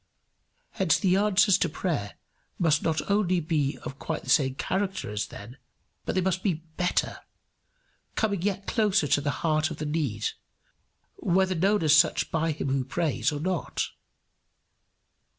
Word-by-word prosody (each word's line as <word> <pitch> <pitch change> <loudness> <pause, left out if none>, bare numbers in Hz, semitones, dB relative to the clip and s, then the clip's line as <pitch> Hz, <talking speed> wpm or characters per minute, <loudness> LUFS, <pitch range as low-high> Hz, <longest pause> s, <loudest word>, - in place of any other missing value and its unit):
Hence 185 -4 +2
the 185 -2 +2
answers 200 -1 +4
to 165 - +1
prayer 150 - -3 0.4
must 155 -3 +2
not 160 -1 -1
only 190 -3 +2
not 155 - -8
be 145 -5 0
of 135 - -7
quite - - -4
the 130 - -2
same 130 -1 +3
character 190 - -2
as 105 0 -2
then, 115 +6 -11 0.5
but - - -2
they 185 - +2
must 185 0 0
be 165 -5 -1
better, 180 0 0 1.0
coming 200 -5 0
yet 195 0 -2
closer 210 -7 +2
to 145 +1 +2
the 145 - -1 0.2
heart 155 -1 +2
of - - -6
the 155 - -4
need, 145 -9 -1 0.9
whether 185 +1 +2
known 195 +3 +2
as 155 -1 +6
such 155 0 +3
by 165 0 0
him 145 -2 -3
who 135 0 +1
prays, 140 -4 -1
or 145 - -4
not. 180 +1 -2
165 Hz, 160 wpm, -27 LUFS, 145-190 Hz, 1.0 s, as